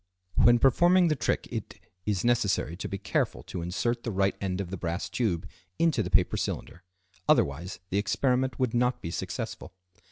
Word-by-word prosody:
When 120 0 +6
performing 175 +8 +5
the 155 - +2
trick 120 - -1
it, - - -5 0.3
is 100 -2 0
necessary 105 -8 +1
to 90 - -5
be 100 - -3
careful - - -1
to 90 - -6
insert 115 +8 -1
the 120 - -4
right 95 0 +1
end 95 -1 -2
of 95 -3 -4
the - - -2
brass 85 +2 -3
tube 95 -9 -1 0.3
into 165 -2 +2
the - - -3
paper - - +3
cylinder, 90 - -4 0.5
otherwise 80 +7 +2
the 100 - +2
experiment 125 +5 +1
would 130 -4 0
not 125 +1 +1
be 85 - -3
successful. 90 - -5
105 Hz, 180 wpm, -28 LUFS, 90-125 Hz, 0.5 s, When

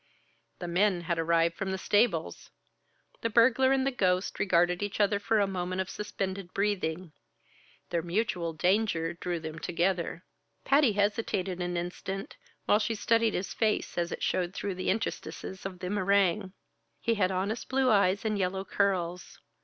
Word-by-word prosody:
The 175 - -6
men 180 +1 +2
had 170 0 -2
arrived 165 0 +2
from 195 +2 -3
the 190 - -1
stables. 210 +5 +1 0.7
The 230 - 0
burglar 245 +3 +4
and 265 -1 +2
the 275 - +1
ghost 185 -6 0
regarded 175 -1 +2
each 205 +1 -3
other 205 -1 +3
for 215 +2 +1
a 200 - +4
moment 185 -1 -3
of 190 0 -2
suspended 195 -3 -4
breathing; 185 -4 -1 0.8
their 170 -1 +1
mutual 175 -1 -1
danger 175 0 +1
drew 175 0 -3
them 160 0 -7
together. 175 0 -1 0.4
Patty 275 -5 +4
hesitated 200 -3 0
an 175 0 -2
instant, 190 +3 -5 0.3
while 210 - +4
she 225 +1 -1
studied 230 +1 +2
his 185 - -3
face 220 -2 0
as 170 -1 -1
it - - -5
showed 180 0 0
through 200 - -2
the 185 0 -3
interstices 190 -2 -3
of 185 -1 -10
the 180 0 -5
meringue. 200 -1 +2 0.5
He 230 - +1
had 200 -4 +2
honest 195 +5 -2
blue 265 -1 +3
eyes 200 0 +3
and 215 -2 0
yellow 190 +1 -1
curls. 180 -3 -1
190 Hz, 160 wpm, -29 LUFS, 175-210 Hz, 0.8 s, burglar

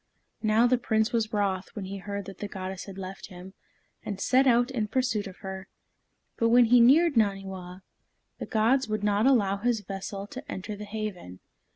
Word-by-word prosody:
Now 220 +2 +3
the 245 0 +3
Prince 220 -2 +1
was 225 -2 0
wroth 195 -3 -1
when 205 -3 -5
he 195 +1 -6
heard 200 0 -5
that 195 0 -10
the 205 - -4
goddess 190 -1 -6
had 195 -1 -10
left 190 0 -7
him, 185 0 -11 0.5
and 200 -2 -5
set 260 +5 +3
out 245 +1 +3
in 225 -5 -1
pursuit 225 -3 -1
of 190 - -11
her. 190 0 -6 0.7
But 230 - +2
when 240 +1 +6
he 245 +2 +5
neared 300 +7 +6
Naniwa, 190 -3 -1 0.6
the - - -5
gods 240 +4 +2
would 215 -1 -2
not 210 +3 +2
allow 205 -7 +3
his 230 +1 0
vessel 195 0 -6
to 265 +7 -9
enter 200 +3 -5
the 210 +1 -8
haven. 205 - -6
210 Hz, 190 wpm, -27 LUFS, 195-235 Hz, 0.7 s, when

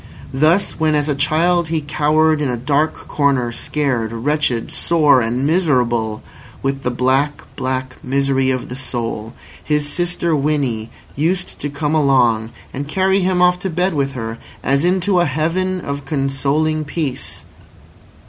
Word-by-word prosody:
Thus 160 +9 +2
when 155 -1 +2
as 145 0 +1
a 150 - +1
child 160 +4 +2
he 160 0 0
cowered 155 +1 +2
in 145 - 0
a 125 - -1
dark 145 +5 +1
corner 135 -5 +1
scared, 125 -3 -1
wretched, 125 0 -1
sore, 150 -6 +4
and 120 +4 -1
miserable 125 -10 +1 0.4
with 135 0 -1
the 125 - -1
black, 130 +4 0
black 130 -1 -3
misery 135 0 +1
of 130 -1 -1
the 125 - -6
soul, 115 -3 -4 0.3
his 150 -1 0
sister 170 +1 0
Winnie 135 -7 -1 0.3
used 175 +5 -1
to 145 - -3
come 145 +1 -2
along, 125 -7 +3 0.2
and 140 +2 -4
carry 190 +4 +2
him 180 -1 +2
off 180 0 +4
to 190 - -3
bed 180 +2 0
with 140 -2 -1
her, 115 -2 -5 0.2
as 140 +2 +2
into 185 +1 +2
a 175 - +3
heaven 170 +6 -1
of 140 -2 -4
consoling 145 +2 0
peace. 145 -3 -4
145 Hz, 150 wpm, -18 LUFS, 130-160 Hz, 0.4 s, sore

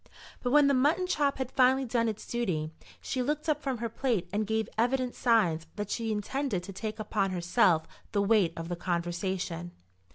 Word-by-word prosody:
But 245 - -1
when 295 +2 +6
the 280 - +4
mutton 295 +8 +3
chop 290 -6 +1
had 260 -1 -3
finally 265 +1 +4
done 230 -1 +1
its 215 -1 -6
duty, 180 -10 -2 0.3
she 255 - -2
looked 300 +4 -1
up 300 -1 +1
from 270 -3 -2
her 230 +1 -2
plate 230 -4 -1
and 210 0 0
gave 220 -1 0
evident 250 +2 +1
signs 175 -10 +2
that 205 -1 -4
she 225 -1 -1
intended 215 -1 -2
to 195 +2 -8
take 215 +2 -4
upon 210 -2 0
herself 175 -2 +3 0.3
the 200 - +1
weight 200 -5 +3
of 165 0 -5
the 175 - -3
conversation. 175 0 -3
220 Hz, 190 wpm, -29 LUFS, 185-260 Hz, 0.3 s, when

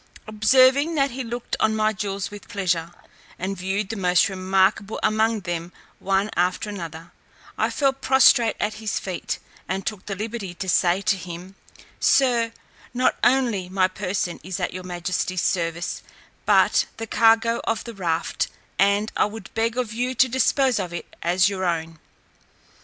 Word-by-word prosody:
Observing 260 +8 +4
that 275 -2 +2
he 260 +2 -4
looked 240 0 -4
on 220 0 +2
my 215 0 +2
jewels 200 -1 -4
with 205 0 -10
pleasure, 175 -4 -1 0.5
and 190 +2 -3
viewed 190 +2 -2
the 225 - -3
most 180 -2 +3
remarkable 190 +2 +1
among 220 0 +2
them 170 -1 -4 0.3
one 195 +2 0
after 180 +4 0
another, 165 -3 -8 0.4
I - - +1
fell 275 -2 +1
prostrate 265 -4 +4
at 210 +1 -1
his 215 -2 -2
feet, 185 -2 -4 0.3
and 190 0 -2
took 210 -4 -5
the 200 - -3
liberty 210 -3 -5
to 190 - -5
say 180 +1 +3
to 200 0 +1
him, 180 +1 -8 0.5
"Sir, 240 -4 +3 0.4
not 255 +1 +2
only 235 -8 +2
my 185 0 +2
person 185 -2 -3
is 185 0 -5
at - - -2
your 185 0 -6
majesty's 180 0 -2
service, 170 -1 -1 0.5
but - - +4
the 225 - -4
cargo 230 +1 +3
of 225 - -1
the 235 - -8
raft, 170 -5 -1 0.3
and 200 +2 +3
I - - +3
would 210 -1 -8
beg 230 +1 0
of 240 -4 -2
you 250 +3 -2
to 260 - +5
dispose 260 -1 +2
of 180 -3 -4
it 170 - -8
as 180 +1 +3
your 195 -2 -2
own." 165 -2 -2
200 Hz, 165 wpm, -23 LUFS, 185-230 Hz, 0.5 s, to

